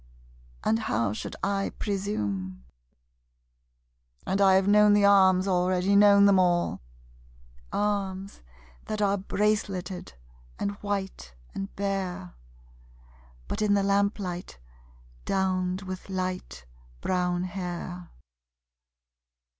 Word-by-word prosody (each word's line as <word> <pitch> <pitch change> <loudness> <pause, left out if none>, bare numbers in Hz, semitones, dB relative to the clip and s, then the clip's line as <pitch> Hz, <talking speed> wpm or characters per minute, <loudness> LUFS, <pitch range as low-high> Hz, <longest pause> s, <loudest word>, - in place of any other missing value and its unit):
And 225 - +2
how 115 - -1
should - - -6
I 195 0 -1
presume? 100 - -3 1.6
And 195 +1 0
I 190 -1 +6
have 190 0 +3
known 210 0 +6
the 205 -1 +4
arms 190 -1 +5
already, 185 +1 +2
known 200 0 +7
them 200 -2 +5
all 175 - +1 0.9
Arms 200 -1 -2 0.4
that 215 - -4
are 200 -1 +2
braceleted 195 - -2 0.4
and 200 - -1
white 195 - -4 0.2
and 195 +1 -5
bare 190 - -3 1.1
(But - - -3
in 205 -1 +3
the 200 - +2
lamplight, 200 - -1 0.7
downed 185 -1 0
with 185 0 -7
light 185 - -4 0.4
brown 180 -1 0
hair!) 180 -1 -6
190 Hz, 100 wpm, -27 LUFS, 180-200 Hz, 1.6 s, known